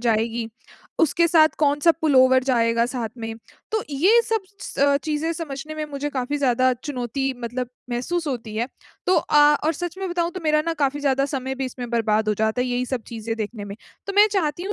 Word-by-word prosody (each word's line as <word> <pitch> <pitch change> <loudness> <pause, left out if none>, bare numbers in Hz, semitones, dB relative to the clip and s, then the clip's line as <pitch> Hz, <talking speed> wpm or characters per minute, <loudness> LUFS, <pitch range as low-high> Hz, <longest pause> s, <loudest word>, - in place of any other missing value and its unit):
जाएगी। 230 0 0 0.5
उसके 335 +1 +3
साथ 315 -2 +6
कौन-सा 295 +2 +4
पुल 310 -3 +2
ओवर 260 0 +6
जाएगा 230 -3 +2
साथ 240 -3 -3
में। 225 0 -5 0.4
तो 435 - +1
ये 370 +12 +4
सब 445 -2 -1 0.2
स - - -7
अ, 280 0 +4
चीज़ें 305 +3 -2
समझने 310 -2 -6
में 310 - -3
मुझे 285 +1 -3
काफ़ी 270 +2 -2
ज़्यादा 255 -1 +3
चुनौती 270 0 -3
मतलब 245 +1 -3 0.2
महसूस 310 +8 -2
होती 230 -6 -4
है। 235 +3 -1 0.4
तो 365 - +4
अ, 295 0 +5
और 315 - +2
सच 350 +3 -5
में 385 - -3
बताऊँ, 345 -1 0
तो 370 - -7
मेरा 305 0 +3
ना 330 - 0
काफ़ी 285 +2 -1
ज़्यादा 275 -1 +2
समय 265 0 -2
भी 265 - -3
इसमें 250 -1 -6
बर्बाद 220 -2 +1
हो 210 - +2
जाता 220 +3 0
है, - - -2
यही 250 +1 -1
सब 255 -3 -3
चीज़ें 225 -1 -4
देखने 215 -1 -5
में। 200 0 -8 0.3
तो 395 - -3
मैं 415 - +8
चाहती 345 -4 0
हूँ 405 +2 -3
270 Hz, 210 wpm, -23 LUFS, 240-310 Hz, 0.5 s, मैं